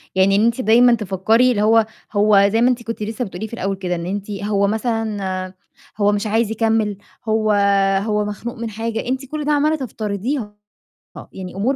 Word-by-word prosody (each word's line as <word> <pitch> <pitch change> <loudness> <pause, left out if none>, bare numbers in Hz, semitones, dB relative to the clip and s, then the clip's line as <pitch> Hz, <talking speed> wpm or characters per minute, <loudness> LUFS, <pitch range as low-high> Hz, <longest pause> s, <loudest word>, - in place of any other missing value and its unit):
يعني 195 +1 +4
إن 215 +3 +3
أنتِ 235 +2 +1
دايمًا 240 +1 +5
تفكّري 220 +4 +2
اللي 205 - 0
هو 220 +1 +4 0.3
هو 205 -1 +4
زي 225 - +2
ما 245 - +5
أنتِ 240 -1 -1
كنتِ 230 -2 -5
لسّه 225 +4 -3
بتقولي 190 +3 -6
في 235 - -16
الأول 195 -3 -2
كده، 180 -2 -3
إن 170 0 -5
أنتِ 200 +2 -4
هو 200 0 0
مثلًا 205 -4 -2 0.4
هو 205 0 +3
مش 205 +1 -1
عايز 220 +1 +1
يكمّل، 220 -2 0 0.3
هو 215 -1 +1 0.5
هو 210 -1 0
مخنوق 210 +3 -5
من 230 -1 -4
حاجة؟ 225 +2 -4
أنتِ 260 +2 -2
كل 300 +2 -5
ده 300 - +1
عَمّالة 300 +2 +2
تفترضيها، 220 -2 -4 0.8
يعني 185 -1 -8
أمور 240 +8 0
215 Hz, 190 wpm, -20 LUFS, 200-235 Hz, 0.8 s, دايمًا